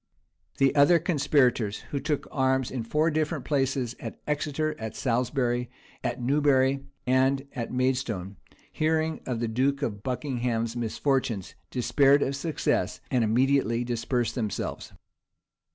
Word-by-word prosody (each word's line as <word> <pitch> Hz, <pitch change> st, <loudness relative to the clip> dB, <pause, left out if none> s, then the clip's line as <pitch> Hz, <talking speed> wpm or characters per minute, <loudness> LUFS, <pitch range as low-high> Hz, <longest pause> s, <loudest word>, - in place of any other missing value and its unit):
[*] -, -, -40 dB
The 135 Hz, 0 st, +3 dB
other 145 Hz, +4 st, +6 dB
conspirators, 140 Hz, -, +1 dB
who 140 Hz, -, -1 dB
took 145 Hz, +1 st, -2 dB
arms 130 Hz, -2 st, +1 dB
in 130 Hz, -, -3 dB
four 150 Hz, +8 st, +1 dB
different 155 Hz, -2 st, -1 dB
places, 135 Hz, -4 st, 0 dB
at -, -, -7 dB
Exeter, 150 Hz, +1 st, -1 dB
at 110 Hz, -1 st, -5 dB
Salisbury, 125 Hz, 0 st, 0 dB, 0.3 s
it -, -, -2 dB
Newbury, 135 Hz, 0 st, +2 dB, 0.2 s
and 135 Hz, +2 st, +2 dB
at 120 Hz, -4 st, -4 dB
Maidstone, 125 Hz, -7 st, -1 dB, 0.3 s
hearing 160 Hz, 0 st, 0 dB
of 125 Hz, -3 st, -2 dB
the 120 Hz, -, -1 dB
duke 135 Hz, +5 st, 0 dB
of 105 Hz, -6 st, -3 dB
Buckingham's 120 Hz, -2 st, -2 dB
misfortunes, 120 Hz, -3 st, -1 dB, 0.2 s
despaired 140 Hz, +3 st, +3 dB
of 135 Hz, -, -1 dB
success, 155 Hz, +3 st, -1 dB
and 125 Hz, -3 st, +3 dB
immediately 120 Hz, +1 st, +2 dB
dispersed 120 Hz, -1 st, -1 dB
themselves. 110 Hz, -6 st, -3 dB
130 Hz, 130 wpm, -27 LUFS, 120-140 Hz, 0.3 s, other